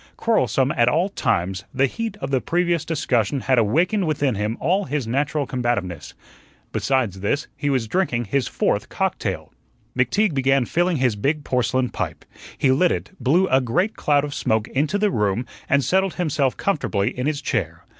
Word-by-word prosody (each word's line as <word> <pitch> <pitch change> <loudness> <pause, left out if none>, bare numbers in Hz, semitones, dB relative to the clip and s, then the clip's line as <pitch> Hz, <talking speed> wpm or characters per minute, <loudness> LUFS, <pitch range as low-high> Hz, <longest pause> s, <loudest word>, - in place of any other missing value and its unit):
Quarrelsome 135 - +2
at 120 -1 +4
all 170 +8 +1
times, 95 - -1
the 135 +1 +4
heat 220 - -4
of - - -4
the 130 -2 +2
previous 175 -2 0
discussion 135 -6 0
had 130 -1 +3
awakened 170 - +2
within 145 -4 +1
him 105 +2 -2
all 185 +7 +1
his 145 -2 -2
natural 140 +5 0
combativeness. 120 - -3 0.6
Besides 120 -8 0
this, 120 +10 -1
he 145 - -2
was 130 -5 0
drinking 120 - 0
his 125 +4 0
fourth - - -1
cocktail. - - -2 0.4
McTeague 160 - +2
began 135 -1 +2
filling 175 +5 +1
his 125 -4 +1
big 145 +8 -1
porcelain 125 0 0
pipe. - - -5 0.3
He 135 - +3
lit 170 +7 +3
it, - - -3
blew 175 +9 +3
a 130 +1 +4
great 180 - 0
cloud 145 -1 +2
of 145 - -6
smoke 110 -3 0
into 150 +8 0
the 205 0 +1
room, 105 - 0 0.2
and 140 0 +3
settled 190 +3 +1
himself 145 -6 0
comfortably 120 - 0
in 125 +2 -2
his 150 -2 -1
chair. 145 - -3
135 Hz, 175 wpm, -22 LUFS, 120-165 Hz, 0.6 s, at